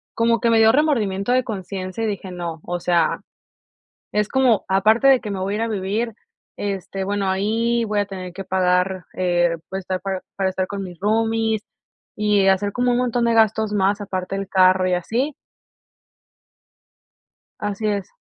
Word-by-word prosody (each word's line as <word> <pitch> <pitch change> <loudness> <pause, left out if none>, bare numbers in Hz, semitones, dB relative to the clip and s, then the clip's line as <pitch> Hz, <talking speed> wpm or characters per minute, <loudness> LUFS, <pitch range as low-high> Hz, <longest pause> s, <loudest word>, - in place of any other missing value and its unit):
Como 230 0 +2
que 235 -2 +2
me 225 - +4
dio 220 0 +7
remordimiento 230 -8 +1
de 255 0 +3
conciencia 190 -1 -5
y - - +1
dije: 200 -2 -4
"No", 170 -3 -5
o 175 0 -3
sea, 170 -2 +1 0.9
es 210 0 +1
como 255 -6 +3
aparte 215 +7 +4
de 265 -2 +6
que 210 - -7
me 190 - -3
voy 195 +2 -2
a - - -2
ir - - -2
a - - -1
vivir 215 +2 -2 0.4
este, 195 -1 -4
bueno, 200 0 -1
ahí 225 +5 +1
voy 210 -1 -2
a 205 - +1
tener 185 -2 -7
que 195 +2 -7
pagar 185 0 +1
eh, 175 -2 +1
pues 190 - -3
estar 185 0 -3
pa-para 190 0 -3
estar 185 0 -2
con 200 -1 -5
mis 175 -3 -9
roomies 225 +1 +1 0.5
y 210 -2 +2
hacer 200 +1 +2
como 245 0 +1
un 240 - +2
montón 245 -1 +1
de 235 - +2
gastos 220 -1 +2
más 200 +1 +1
aparte 190 -1 -4
del 195 - -4
carro 185 -1 +4
y 180 - +1
así. 245 - -1 2.3
Así 205 +1 -2
es. 200 -3 -2
200 Hz, 180 wpm, -21 LUFS, 185-225 Hz, 2.3 s, dio